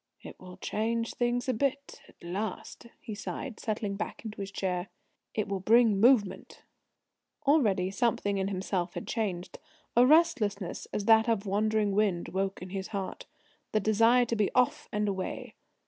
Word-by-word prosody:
"It - - -11
will 180 -1 -11
change 230 +4 -2
things 245 +1 0
a 255 - +2
bit 275 +4 -2
at - - -19
last," 200 +6 -5
he 220 - -6
sighed, 215 +4 -6
settling 210 -2 -3
back 215 - -5
into 215 -2 -6
his 195 - -4
chair. 185 -2 -2 0.5
"It 215 - -1
will 195 -1 -2
bring 220 +1 +4
movement!" 225 -3 +2 0.8
Already 210 -11 +3
something 205 -2 0
in 190 - 0
himself 185 -2 -2
had - - -5
changed. 190 -6 -3 0.4
A 240 - +7
restlessness, 250 - +2
as 205 - -2
of - - -9
that 220 -1 +4
wandering 210 +1 +1
wind, 195 -4 +1
woke 195 0 -2
in 185 - -9
his 190 -1 -4
heart 195 -3 -5 0.5
the 215 - +3
desire 225 +4 +4
to 235 - -2
be 210 -3 +1
off 285 +4 +2
and 210 0 0
away. 190 -2 -4
210 Hz, 165 wpm, -29 LUFS, 195-230 Hz, 0.8 s, A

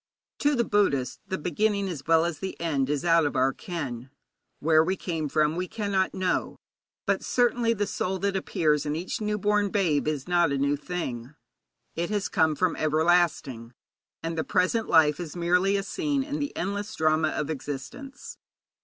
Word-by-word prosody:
To 290 0 +2
the 235 - +2
Buddhist 170 - +1
the 190 -1 -2
beginning 200 +5 0
as 160 -7 -6
well 165 0 +4
as 170 -4 -3
the 190 - -5
end 145 -5 0
is 145 +2 -1
out 165 -2 +4
of - - -5
our 130 +1 +2
ken. 135 -8 -6 0.5
Where 155 +1 +4
we 185 +4 0
came 160 -6 -3
from 155 +2 +2
we 180 +1 -2
cannot 200 -3 -1
know, 185 -1 -1 0.5
but - - 0
certainly 240 -1 +2
the 205 0 0
soul 190 -1 -2
that 200 +1 -1
appears 155 -5 +1
in 150 0 -2
each 175 +6 -4
newborn 210 -1 +1
babe 170 -8 +1
is 150 -2 -2
not 175 -3 +3
a 140 - 0
new 140 +1 +1
thing. 145 -5 -5 0.6
It 170 +1 -2
has 205 -2 -1
come 160 -1 +2
from 180 +2 +1
everlasting, 155 -7 +1 0.5
and 165 0 -3
the 160 - -1
present 190 +5 +1
life 150 -2 +5
is 170 -3 -6
merely 180 +3 +2
a 195 - -2
scene 285 - -1
in 290 +2 -4
the 285 -1 -4
endless 200 +2 -3
drama 155 0 +2
of 150 0 -2
existence. 150 - -7
170 Hz, 180 wpm, -26 LUFS, 150-200 Hz, 0.6 s, life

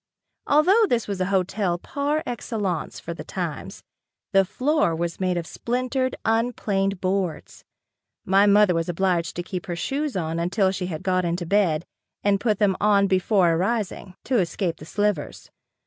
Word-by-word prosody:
Although 370 +10 +5
this 235 - 0
was 200 -2 -3
a 185 - +1
hotel 190 -1 0
par 290 - -2
excellence 205 -7 -3
for 170 - -6
the 165 - -8
times, 175 -6 -5 0.5
the 195 0 +5
floor 255 - +1
was 170 0 -3
made 185 -1 0
of 170 - -3
splintered, 255 +5 -2
unplaned 210 -4 0
boards. 185 -3 -2 0.6
My 195 +2 +4
mother 205 -2 +5
was 165 0 -1
obliged 175 -1 0
to 175 - -3
keep 185 +2 -6
her 175 - -3
shoes 275 - -2
on 165 -1 -2
until 190 +3 +1
she 185 -1 -3
had 160 -1 -5
got 185 -1 +1
into 175 0 -2
bed 170 -4 +2 0.4
and 200 -1 +3
put 215 -2 +1
them 200 -3 +2
on 205 -1 +4
before 185 -1 +3
arising, 190 +1 -2
to 255 -3 +1
escape 180 -1 -1
the 155 - -11
slivers. 205 -3 -2
195 Hz, 165 wpm, -24 LUFS, 175-215 Hz, 0.6 s, Although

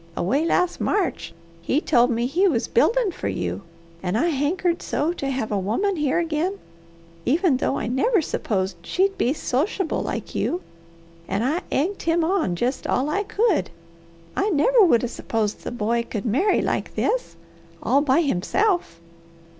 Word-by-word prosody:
Away 275 - +1
last 360 +1 +1
March 395 -4 -1 0.3
he 260 - +1
told 245 -6 +3
me 235 -1 0
he 345 +10 +2
was 245 -10 0
buildin' 470 -4 +2
for - - -5
you, - - -3 0.4
an' 180 +1 -2
I 325 +10 +2
hankered 335 +4 0
so 315 +4 -1
to 275 -5 -4
have 255 -5 -2
a 205 - +1
woman 305 - 0
here 300 -3 0
again, 335 +3 -1 0.7
even 310 - +2
though 270 - 0
I - - -3
never 270 - +2
s'posed 190 - -2
she'd 385 - 0
be 255 - +1
sochiable 315 - -1
like - - -4
you, 355 +2 -1 0.6
that 195 +4 -1
I 305 +8 0
egged 370 +8 0
him 330 0 +1
on 325 - +1
jest 245 +9 -2
all 280 +4 0
I 400 - +1
could. 415 -2 +1 0.7
I 400 - +1
never 430 +9 +4
would 250 -11 +4
'a' - - +1
s'posed 220 -3 -2
the - - -4
boy 235 0 0
could 215 -1 -4
marry 285 - +2
like - - -2
this - - -1 0.5
all 280 - +3
by 285 +2 +3
himself." 335 - 0
300 Hz, 165 wpm, -23 LUFS, 240-365 Hz, 0.7 s, never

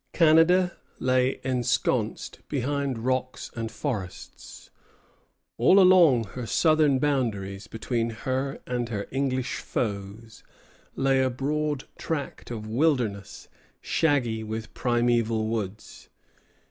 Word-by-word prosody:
Canada 170 +2 +4 0.2
lay 130 0 +1
ensconced 125 -3 -1
behind 140 -3 -2
rocks 130 0 -2
and 115 -1 -4
forests. 110 -9 -6 0.9
All 185 +12 +6
along 175 -10 +6
her 125 -2 -5
southern 155 - +3
boundaries, 110 -9 -1
between 115 +1 -2
her 130 +4 -3
and 120 -1 -2
her 100 -3 -3
English 130 -1 -1
foes, 105 0 -4 0.5
lay 135 0 +2
a 130 - +2
broad 145 +2 -2 0.2
tract 150 -4 -4
of 110 -3 -5
wilderness, 110 -5 -1 0.3
shaggy 125 -8 0
with 110 0 -6
primeval 120 -2 +1
woods. 110 -2 -5
125 Hz, 100 wpm, -26 LUFS, 115-140 Hz, 0.9 s, All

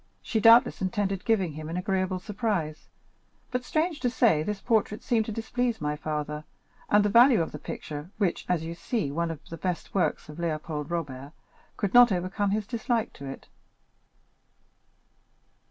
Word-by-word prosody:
She 225 - 0
doubtless 230 +1 +6
intended 195 0 -1
giving 195 -7 +2
him 155 +1 -7
an 170 - -3
agreeable 185 0 0
surprise; 190 -6 -3 0.6
but, 250 0 -1
strange 315 +4 0
to 245 - +1
say, 235 -10 +3
this 205 +5 -3
portrait 220 -2 0
seemed 225 -3 +1
to - - -3
displease 235 +2 -1
my 150 0 -1
father, 150 0 -4 0.5
and 205 0 +5
the - - +3
value 240 +3 +7
of 165 - -1
the - - -7
picture, 150 +2 -7
which 200 -5 0
is, - - -25
as 175 -3 +1
you 165 +1 -4
see, 170 - -2
one 170 +3 -1
of 160 -2 -7
the 165 - -5
best 180 -2 -3
works 195 - 0
of 150 0 -10
Léopold 155 -2 -3
Robert, 145 -4 -4 0.4
could 200 - -1
not 245 -2 +8
overcome 185 +2 0
his 210 +1 0
dislike 230 0 -1
to 140 - -9
it. 135 - -8
190 Hz, 170 wpm, -27 LUFS, 155-225 Hz, 0.6 s, not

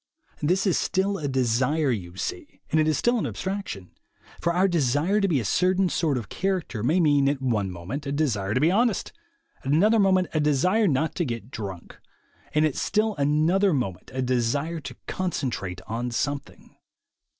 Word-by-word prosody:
This 180 +7 +1
is 190 - +2
still 195 +1 0
a 145 - -2
desire, 130 +3 +1
you 90 -6 -4
see, - - -5
and 155 - +3
it 155 - +3
is 155 - +2
still 240 0 +2
an - - -1
abstraction; 190 - -5 0.5
for 170 - +1
our 180 +3 +3
desire 165 +4 +1
to 195 - +3
be 155 -7 +2
a 115 - -3
certain 185 - +2
sort 155 -6 0
of 115 -5 -5
character 185 - -2
may 155 - +2
mean 145 -4 +4
at 140 -1 -1
one 110 -7 0
moment 95 - -6
a - - -2
desire 115 -9 0
to - - +3
be 155 +5 +3
honest, 225 0 +1 0.5
at 135 - -2
another 210 +9 +4
moment 185 -2 +3
a 155 - +1
desire 180 +9 +2
not 155 +1 +1
to 175 - -1
get 115 -4 -5
drunk, 95 -5 -7 0.5
and 150 +1 +3
at 150 - 0
still 215 0 +1
another 155 +6 +2
moment 95 -9 -3
a 130 0 -2
desire 130 +7 0
to 135 -4 -8
con 185 -1 -2
centrate 95 - -3
on 120 +2 -3
something. 140 +4 -4
150 Hz, 185 wpm, -25 LUFS, 125-185 Hz, 0.5 s, mean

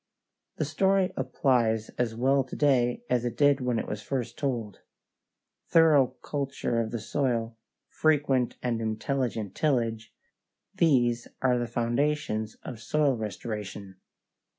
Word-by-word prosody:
The 155 - -1
story 190 +5 +2
applies 125 -4 +1
as 120 -2 -2
well 135 +3 +3
to 130 - -8
day 135 - +2
as 120 -1 +1
it 120 -1 -3
did 145 -1 +4
when 125 -2 0
it - - -3
was 105 - -4
first 120 -1 -3
told. 120 -8 -3 0.9
Thorough 145 -6 +5
culture 135 -5 -2
of 110 - -3
the 120 - -3
soil, 115 -1 -1 0.3
frequent 140 -5 +1
and 120 -2 -1
intelligent 110 -2 -2
tillage 115 -6 0 0.6
these 120 -7 +2 0.2
are 125 -2 +3
the 120 - -2
foundations 120 -2 -1
of 120 -4 -7
soil 145 +3 +1
restoration. 105 -3 -6
125 Hz, 125 wpm, -28 LUFS, 115-140 Hz, 0.9 s, Thorough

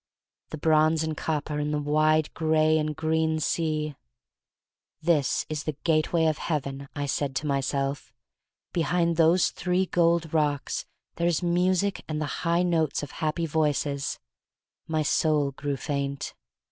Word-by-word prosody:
The 155 - -6
bronze 155 +1 +3
and 160 -1 -2
copper 150 -1 -2
in 150 0 -1
the 150 - 0
wide 155 +1 +2
gray 155 0 +3
and. 155 0 -2
green 160 0 +1
sea! 155 -1 -1 1.1
"This 155 -4 +1
is 155 -1 -4
the 155 -3 -3
gateway 160 0 +2
of 155 -3 +1
Heaven," 140 -3 -3
I 145 - -2
said 140 -1 -2
to 150 - -2
myself. 140 0 -1 0.6
"Behind 170 0 +1
those 165 +2 +4
three 180 +1 0
gold 170 -2 +1
rocks 150 -3 0 0.3
there 170 - +1
is 175 +1 +1
music 180 +3 +1
and 155 -1 -3
the 155 - -1 0.2
high 170 0 +2
notes 160 -5 +1
of 140 - -6
happy 160 +2 -1
voices." 145 -3 0 0.7
My 155 -1 0
soul 150 -1 +2
grew 140 +1 -3
faint. 140 -1 -3
155 Hz, 145 wpm, -26 LUFS, 145-165 Hz, 1.1 s, those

